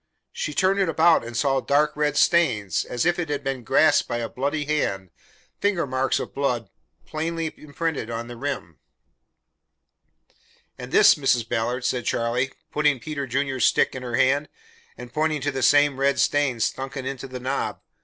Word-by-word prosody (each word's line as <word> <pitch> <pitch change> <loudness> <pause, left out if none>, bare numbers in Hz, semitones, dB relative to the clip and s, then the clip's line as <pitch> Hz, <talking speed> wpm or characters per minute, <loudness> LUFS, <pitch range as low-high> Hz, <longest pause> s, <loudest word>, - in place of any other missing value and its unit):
She 485 +1 -4
turned 195 +1 +2
it 190 -3 +2
about 165 -1 +4
and 120 0 -6
saw 135 +1 +2
dark 145 +3 +1
red 150 0 0
stains, 125 - +2
as 120 +5 -2
if 175 0 +2
it 165 -3 -3
had 145 -1 -2
been 135 -2 -3
grasped 150 +7 +3
by 120 - -2
a 115 -1 -3
bloody 145 +5 -2
hand 95 - -2 0.5
finger 200 -5 +1
marks 130 0 0
of - - -6
blood 125 -5 -2 0.3
plainly 165 +1 -3
imprinted 150 -4 -4
on 115 0 -4
the 120 - -8
rim. 130 - -5 2.0
"And - - -9
this, - - +7
Mrs. 125 -5 +1
Ballard," 120 +3 -2
said 125 -1 -1
Charlie, 120 +3 0 0.2
putting 150 -3 +2
Peter 140 +2 -5
Junior's 135 -1 0
stick - - +3
in 130 - -6
her 120 -2 -3
hand, 140 +4 +2 0.5
and 125 0 -10
pointing 155 0 0
to 145 +2 -1
the 135 -1 -4
same 145 +1 +4
red 140 0 +2
stains 135 -6 +2
sunken 135 0 -4
into 135 0 -5
the 130 -1 -7
knob. 130 +2 -3
135 Hz, 175 wpm, -24 LUFS, 125-150 Hz, 2.0 s, this